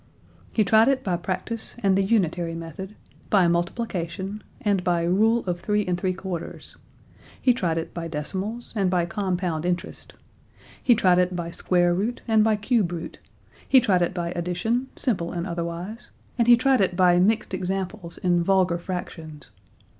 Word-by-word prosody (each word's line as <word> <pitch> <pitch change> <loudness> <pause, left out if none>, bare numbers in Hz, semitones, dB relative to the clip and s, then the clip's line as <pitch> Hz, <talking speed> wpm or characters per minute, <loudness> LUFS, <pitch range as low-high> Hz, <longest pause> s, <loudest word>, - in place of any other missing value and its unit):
He 220 - +2
tried 220 +4 +5
it 270 -1 +2
by 180 -3 0
practice 190 +6 -2
and 195 -1 +4
the 195 - +3
unitary 175 -5 0
method, 165 +5 -8 0.3
by 190 -4 +4
multiplication, 180 +2 -2 0.2
and 200 -3 0
by 175 -2 +1
rule 220 +7 +2
of 175 -2 -2
three 210 +1 0
and 180 - 0
three 185 +1 -1
quarters. 180 -3 -6 0.6
He 250 - +4
tried 175 -8 -1
it 165 - -4
by 170 -1 -4
decimals 190 +9 -4
and 195 -3 +1
by 180 -2 +1
compound 180 -3 -2
interest. 180 -1 -3 0.7
He 245 - +5
tried 180 -4 +4
it 180 0 +1
by 170 -1 -4
square 175 0 +2
root 210 +7 -2
and 220 -2 +4
by 220 0 +3
cube 210 -3 +1
root. 165 -1 -6 0.5
He 265 - +7
tried 195 -8 +2
it 175 +1 0
by 170 -1 -2
addition, 180 +9 -1
simple 185 -10 -1
and 170 0 -3
otherwise, 175 +6 -5 0.3
and 235 -2 +1
he 240 0 +8
tried 260 0 +3
it 185 -2 +1
by 180 -1 +4
mixed 210 +2 +1
examples 185 -1 -3
in 175 -1 +1
vulgar 185 -2 +2
fractions. 165 -4 -7
185 Hz, 170 wpm, -24 LUFS, 175-210 Hz, 0.7 s, he